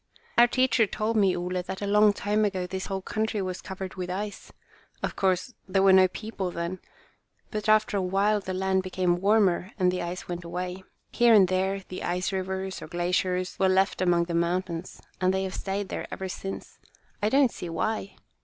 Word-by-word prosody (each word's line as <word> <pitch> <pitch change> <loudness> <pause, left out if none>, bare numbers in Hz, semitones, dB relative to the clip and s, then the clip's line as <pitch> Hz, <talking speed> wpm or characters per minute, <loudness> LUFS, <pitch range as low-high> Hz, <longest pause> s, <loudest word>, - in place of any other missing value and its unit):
"Our 240 0 +7
teacher 250 -3 +3
told 215 +3 -2
me, 195 -4 +3
Ole, 180 +1 -2
that 190 +1 -6
a 205 - -3
long 210 +1 +5
time 205 +1 0
ago 190 -3 0
this 190 +1 -5
whole 190 -1 -3
country 220 +1 -1
was 185 -1 -3
covered 190 0 -6
with 180 -1 -5
ice. 200 +2 -5 0.5
Of - - -2
course, 190 +5 0
there 190 0 +2
were 195 -1 +7
no 190 0 +7
people 195 -1 -5
then. 170 +2 -4 0.7
But 215 0 -2
after 215 -1 +4
a - - +1
while 195 +3 +2
the 185 -2 -5
land 190 0 +1
became 180 -1 0
warmer 195 -2 +2
and 180 -2 +3
the 180 - -2
ice 175 +1 -5
went 175 0 -5
away. 180 +2 -5 0.3
Here 240 -1 +5
and 195 -3 +7
there, 190 +2 0
the 185 - -7
ice 180 +2 -1
rivers, 190 0 -3
or - - -7
glaciers, 180 +1 -1
were 190 - +4
left 190 0 +2
among 175 -2 +3
the 170 0 -5
mountains, 170 +1 -2 0.2
and 185 0 +3
they 190 0 0
have 190 -1 -4
stayed 195 0 -3
there - - -4
ever 190 - -5
since. 195 +1 -7 0.4
I 210 - +2
don't 270 -1 +4
see 175 - -7
why." 200 +4 -2
190 Hz, 200 wpm, -27 LUFS, 180-205 Hz, 0.7 s, Our